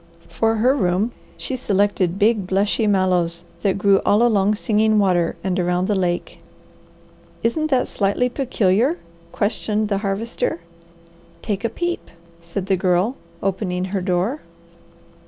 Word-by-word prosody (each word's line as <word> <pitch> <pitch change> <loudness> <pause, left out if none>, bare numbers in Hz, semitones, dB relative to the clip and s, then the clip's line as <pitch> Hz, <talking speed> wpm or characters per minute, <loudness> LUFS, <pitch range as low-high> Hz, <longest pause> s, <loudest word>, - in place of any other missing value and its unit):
For 225 0 +1
her 250 +5 +3
room, 195 0 +1 0.3
she 260 - -4
selected 200 -5 +1
big, 210 -2 +2
blushy 205 +3 +1
mallows 180 -4 +1 0.2
that 195 -2 +1
grew 195 -1 +4
all 210 +3 +3
along 210 -3 +3
Singing 215 0 +2
Water 180 -4 +2
and 185 0 -1
around 180 +1 0
the 210 - +1
lake. 180 -3 -2 1.0
"Isn't 310 +7 +1
that 260 -3 +2
slightly 200 +5 0
peculiar?" 250 - +1 0.3
questioned 210 0 -1
the 200 -2 0
Harvester. 200 -1 -2 0.8
"Take 205 -1 -2
a 230 - +1
peep," 345 +9 -3 0.3
said 170 +3 -5
the 190 -1 +1
Girl, 185 +7 +1 0.3
opening 185 -2 -1
her 195 - 0
door. 185 +10 -1
200 Hz, 135 wpm, -21 LUFS, 185-225 Hz, 1.0 s, grew